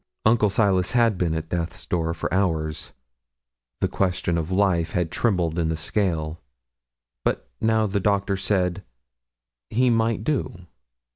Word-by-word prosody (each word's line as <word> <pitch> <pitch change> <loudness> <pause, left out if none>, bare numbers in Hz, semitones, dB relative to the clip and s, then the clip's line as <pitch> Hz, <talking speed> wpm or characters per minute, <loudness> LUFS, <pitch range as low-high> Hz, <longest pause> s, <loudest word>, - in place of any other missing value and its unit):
Uncle 110 -1 +4
Silas 95 -2 +2
had 115 -3 +4
been 85 -3 0
at 80 0 -4
death's 85 -1 -3
door 85 -2 0
for - - -3
hours; 80 -6 0 0.9
the - - +3
question 90 -2 0
of 85 0 -2
life 95 -3 +1
had 90 -3 0
trembled 90 -7 +1
in 80 -1 +1
the 80 - -1
scale; 80 -3 -1 0.8
but - - -1
now 110 0 +3
the 100 0 0
doctor 100 0 +1
said 95 -1 0 0.9
'he 125 +2 +3
might 115 -2 +1
do.' 110 - -2
95 Hz, 140 wpm, -24 LUFS, 85-105 Hz, 0.9 s, Uncle